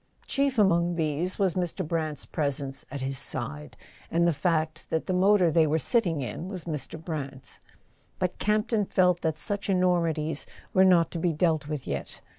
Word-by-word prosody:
Chief 275 Hz, -2 st, 0 dB
among 175 Hz, -4 st, +3 dB
these 160 Hz, +2 st, 0 dB
was 190 Hz, -4 st, +2 dB
Mr. 180 Hz, -1 st, -2 dB
Brant's 155 Hz, -3 st, -2 dB
presence 140 Hz, -3 st, -1 dB
at 140 Hz, 0 st, -6 dB
his 135 Hz, -1 st, -1 dB
side, 75 Hz, 0 st, -3 dB, 0.3 s
and 170 Hz, +1 st, +2 dB
the 170 Hz, -, +3 dB
fact 155 Hz, 0 st, -1 dB
that 160 Hz, -, -1 dB
the 185 Hz, -, -1 dB
motor 185 Hz, -1 st, +4 dB
they 160 Hz, -1 st, +4 dB
were 155 Hz, +2 st, +2 dB
sitting 165 Hz, -, +1 dB
in 130 Hz, -, -5 dB
was 185 Hz, -4 st, -5 dB
Mr. 160 Hz, 0 st, -4 dB
Brant's. 140 Hz, -5 st, -6 dB, 0.6 s
But 185 Hz, -1 st, -2 dB
Campton 215 Hz, 0 st, +1 dB
felt 180 Hz, -2 st, +2 dB
that 160 Hz, -1 st, -1 dB
such 200 Hz, +3 st, -3 dB
enormi¬ 180 Hz, -4 st, +2 dB
ties 155 Hz, -1 st, -2 dB, 0.3 s
were 190 Hz, 0 st, +6 dB
not 175 Hz, -3 st, +4 dB
to 170 Hz, -, -4 dB
be 170 Hz, 0 st, +1 dB
dealt 155 Hz, -2 st, +1 dB
with 150 Hz, -3 st, -4 dB
yet. 70 Hz, 0 st, -5 dB
165 Hz, 180 wpm, -27 LUFS, 150-185 Hz, 0.6 s, were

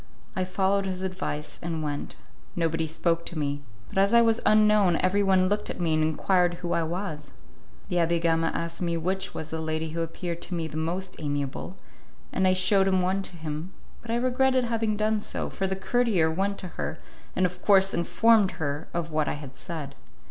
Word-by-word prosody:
I 185 Hz, -2 st, 0 dB
followed 195 Hz, +1 st, +1 dB
his 185 Hz, 0 st, -3 dB
advice 185 Hz, -5 st, -4 dB
and 165 Hz, -2 st, -3 dB
went; 145 Hz, -1 st, -4 dB, 0.4 s
nobody 165 Hz, -1 st, 0 dB
spoke 165 Hz, +1 st, 0 dB
to 170 Hz, -, -3 dB
me, 145 Hz, -1 st, -1 dB, 0.3 s
but -, -, -2 dB
as 200 Hz, +4 st, +4 dB
I 235 Hz, -, +8 dB
was 225 Hz, 0 st, +2 dB
unknown 210 Hz, -4 st, +5 dB
everyone 190 Hz, 0 st, +3 dB
looked 205 Hz, +2 st, 0 dB
at -, -, -5 dB
me 165 Hz, -2 st, +1 dB
and 155 Hz, -, +2 dB
enquired 175 Hz, +3 st, +2 dB
who 175 Hz, 0 st, -3 dB
I 170 Hz, -, +2 dB
was. 165 Hz, -3 st, -4 dB, 0.6 s
The 180 Hz, -, 0 dB
Abbé 170 Hz, 0 st, +2 dB
Gama 165 Hz, 0 st, +2 dB
asked 170 Hz, +1 st, -3 dB
me 170 Hz, -1 st, 0 dB
which 190 Hz, +4 st, -2 dB
was 160 Hz, 0 st, -5 dB
the 160 Hz, 0 st, -3 dB
lady 160 Hz, 0 st, -2 dB
who 165 Hz, +1 st, -2 dB
appeared 170 Hz, +1 st, -4 dB
to 180 Hz, -, -4 dB
me 165 Hz, -1 st, -2 dB
the 155 Hz, -, -10 dB
most 175 Hz, +4 st, -2 dB
amiable, 145 Hz, +3 st, -3 dB, 0.6 s
and 190 Hz, -, +2 dB
I 185 Hz, -, +5 dB
shewed 190 Hz, +1 st, +3 dB
one 185 Hz, +1 st, +2 dB
to 190 Hz, -, -6 dB
him; 155 Hz, +3 st, -5 dB, 0.3 s
but 235 Hz, -, -13 dB
I 230 Hz, -, +1 dB
regretted 255 Hz, +1 st, +2 dB
having 225 Hz, -2 st, 0 dB
done 215 Hz, 0 st, +1 dB
so, -, -, -4 dB
for 195 Hz, -, -1 dB
the 190 Hz, -, -1 dB
courtier 195 Hz, -5 st, +2 dB
went 195 Hz, +4 st, -1 dB
to 185 Hz, -, -6 dB
her, -, -, -4 dB, 0.4 s
and 185 Hz, -, +3 dB
of 180 Hz, 0 st, -3 dB
course 195 Hz, -1 st, +5 dB
informed 210 Hz, +4 st, +3 dB
her 145 Hz, 0 st, -3 dB
of 170 Hz, -1 st, -2 dB
what 155 Hz, -1 st, +1 dB
I -, -, 0 dB
had 140 Hz, -2 st, -9 dB
said. 150 Hz, -5 st, -6 dB
180 Hz, 200 wpm, -27 LUFS, 160-195 Hz, 0.6 s, I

